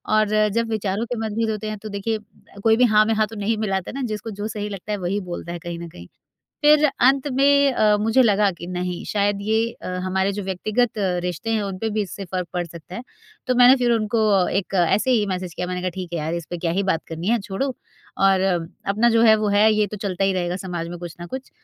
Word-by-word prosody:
और 215 Hz, -1 st, +3 dB, 0.2 s
जब 230 Hz, 0 st, 0 dB
विचारों 215 Hz, 0 st, -1 dB
के 245 Hz, 0 st, -4 dB
मतभेद 220 Hz, +1 st, -1 dB
होते 215 Hz, 0 st, -4 dB
हैं 215 Hz, -, -4 dB
तो 215 Hz, +1 st, -8 dB
देखिए 210 Hz, +2 st, -2 dB
अ, 210 Hz, -1 st, -19 dB
कोई 225 Hz, 0 st, +4 dB
भी 250 Hz, -, +4 dB
हाँ 210 Hz, -, +7 dB
में 225 Hz, -, +1 dB
हाँ 215 Hz, 0 st, +1 dB
तो 225 Hz, -, -11 dB
नहीं 215 Hz, +2 st, -1 dB
मिलाता 195 Hz, -4 st, -2 dB
है -, -, -10 dB
ना? 275 Hz, -, -3 dB
जिसको 215 Hz, +1 st, -5 dB
जो 205 Hz, +1 st, -4 dB
सही 210 Hz, -1 st, -4 dB
लगता 200 Hz, +1 st, -7 dB
है 210 Hz, -, 0 dB
वही 190 Hz, +2 st, -2 dB
बोलता 175 Hz, -1 st, -6 dB
है 175 Hz, -, -6 dB
कहीं 170 Hz, 0 st, -6 dB
न 170 Hz, -, -7 dB
कहीं। 85 Hz, -, -12 dB, 0.6 s
फिर 300 Hz, 0 st, +6 dB
अंत 270 Hz, 0 st, +2 dB
में 280 Hz, +1 st, +4 dB
अ, 210 Hz, -3 st, +3 dB
मुझे 225 Hz, +4 st, +4 dB
लगा 210 Hz, -3 st, +3 dB
कि 175 Hz, -1 st, -9 dB
नहीं 180 Hz, -1 st, -4 dB
शायद 205 Hz, -1 st, 0 dB
ये 220 Hz, +2 st, +1 dB
अ, -, -, -5 dB, 0.2 s
हमारे 190 Hz, +1 st, 0 dB
जो 205 Hz, +1 st, -4 dB
व्यक्तिगत 215 Hz, +5 st, 0 dB, 0.3 s
रिश्ते 180 Hz, +5 st, -3 dB
हैं, 220 Hz, -2 st, +1 dB
उन 195 Hz, -2 st, -4 dB
पे 220 Hz, +3 st, -2 dB
भी 215 Hz, 0 st, 0 dB
इससे 195 Hz, 0 st, -7 dB
फ़र्क 180 Hz, -1 st, -4 dB
पड़ 175 Hz, -1 st, -1 dB
सकता 170 Hz, +1 st, -11 dB
है, 235 Hz, -, -5 dB, 0.4 s
तो 255 Hz, -, +1 dB
मैंने 250 Hz, +2 st, +7 dB
फिर 245 Hz, -2 st, +2 dB
उनको 215 Hz, -4 st, +2 dB
एक 195 Hz, 0 st, -2 dB
ऐसे 215 Hz, +7 st, +2 dB
ही 220 Hz, -4 st, +3 dB
मैसेज 185 Hz, -3 st, -4 dB
किया 180 Hz, -, -3 dB
मैंने 180 Hz, 0 st, -3 dB
कहा, 185 Hz, -, -2 dB
"ठीक 180 Hz, -1 st, -7 dB
है 170 Hz, -, -1 dB
यार, 155 Hz, +2 st, -2 dB
इस 170 Hz, -2 st, -5 dB
पे 175 Hz, -, -4 dB
क्या 165 Hz, -1 st, -1 dB
ही -, -, +2 dB
बात 190 Hz, -4 st, -1 dB
करनी 165 Hz, +3 st, -4 dB
है 235 Hz, +1 st, +3 dB
छोड़ो 230 Hz, +6 st, -3 dB, 0.5 s
और 195 Hz, -1 st, +4 dB, 0.5 s
अपना 215 Hz, +4 st, +3 dB
जो 230 Hz, 0 st, +3 dB
है 220 Hz, -2 st, +7 dB
वो 215 Hz, -1 st, -1 dB
है। 210 Hz, +2 st, +4 dB
ये 210 Hz, -1 st, +2 dB
तो 210 Hz, -, -7 dB
चलता 195 Hz, -2 st, -2 dB
ही 195 Hz, -, +2 dB
रहेगा 180 Hz, -1 st, -1 dB
समाज 175 Hz, -3 st, -5 dB
में 175 Hz, 0 st, -7 dB
कुछ 175 Hz, -2 st, -8 dB
ना 175 Hz, -, -6 dB
कुछ, 260 Hz, +8 st, -7 dB
205 Hz, 260 wpm, -22 LUFS, 180-225 Hz, 0.6 s, हाँ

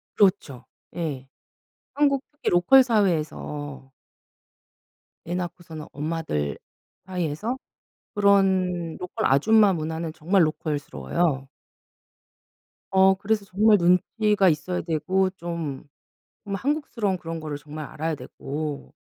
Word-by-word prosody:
그렇죠. 185 Hz, -, +2 dB, 0.3 s
예. 145 Hz, -6 st, -4 dB, 0.7 s
한국 280 Hz, -2 st, +2 dB
특히 295 Hz, -, -2 dB
로컬 190 Hz, +10 st, +6 dB
사회에서 155 Hz, -, -1 dB, 1.3 s
애 175 Hz, +2 st, -3 dB
낳고서는 170 Hz, -3 st, -6 dB
엄마들 145 Hz, -, -2 dB, 0.5 s
사이에서 185 Hz, -, -2 dB, 0.6 s
그런 190 Hz, -4 st, +2 dB
로컬 180 Hz, -, -3 dB
아줌마 205 Hz, +9 st, +5 dB
문화는 160 Hz, -1 st, -3 dB
정말 170 Hz, +4 st, +2 dB
로컬스러워요. 145 Hz, -, -2 dB, 1.4 s
어 190 Hz, 0 st, +5 dB
그래서 205 Hz, +1 st, -1 dB
정말 210 Hz, +3 st, +4 dB
눈치가 195 Hz, +3 st, +3 dB
있어야 175 Hz, +4 st, -1 dB
되고 180 Hz, +4 st, 0 dB
좀 170 Hz, -6 st, -5 dB, 0.6 s
한국스러운 220 Hz, -2 st, -1 dB
그런 165 Hz, -1 st, -6 dB
거를 150 Hz, -2 st, -5 dB
정말 150 Hz, +1 st, -8 dB
알아야 160 Hz, +2 st, -3 dB
되고 145 Hz, +1 st, -6 dB
175 Hz, 235 characters per minute, -25 LUFS, 155-195 Hz, 1.4 s, 로컬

